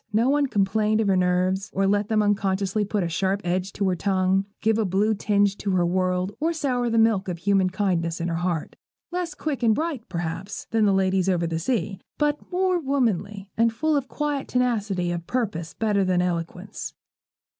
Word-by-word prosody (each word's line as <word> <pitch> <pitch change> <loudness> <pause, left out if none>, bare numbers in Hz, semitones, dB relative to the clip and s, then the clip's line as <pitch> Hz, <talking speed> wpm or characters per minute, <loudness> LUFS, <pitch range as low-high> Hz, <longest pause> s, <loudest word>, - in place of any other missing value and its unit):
No 225 +5 +3
one 290 0 +2
complained 215 0 +1
of 220 - +1
her 190 - +4
nerves, 185 +2 +1
or 195 +1 +1
let 205 +1 +2
them 215 -1 +3
unconsciously 200 0 +1
put 205 -1 -1
a - - 0
sharp 190 +4 0
edge 180 +2 -1
to 200 - 0
her 185 - +1
tongue, 190 +1 +1
give 220 0 +2
a - - +3
blue 205 +3 +2
tinge 205 -1 +1
to 205 - -3
the 175 - +3
world, 185 +2 0
or 325 +3 +1
sour 250 -6 0
the 230 - +1
milk 220 -4 +3
of 180 -2 -3
human 195 +1 +2
kindness 180 -4 -1
in 170 - -2
her 165 -1 -1
heart. 175 -2 -2 0.4
Less 350 -3 -3
quick 295 -3 -3
and 225 -2 +4
bright, 305 -7 -3
perhaps, 170 +2 -4
than 225 -1 +3
the 200 - +4
ladies 190 -1 +2
over 175 -2 +1
the 165 -1 -2
sea, 195 -1 -1 0.2
but 295 +2 -1
more 365 0 +2
womanly, 215 - -1
and 230 0 +3
full 310 +7 0
of 280 -2 0
a - - -31
quiet 295 -1 -2
tenacity 210 -8 0
of 170 -1 -4
purpose 195 -10 -2
better 210 -3 +1
than 185 -1 +1
eloquence. 180 +3 -3
200 Hz, 200 wpm, -24 LUFS, 185-230 Hz, 0.4 s, her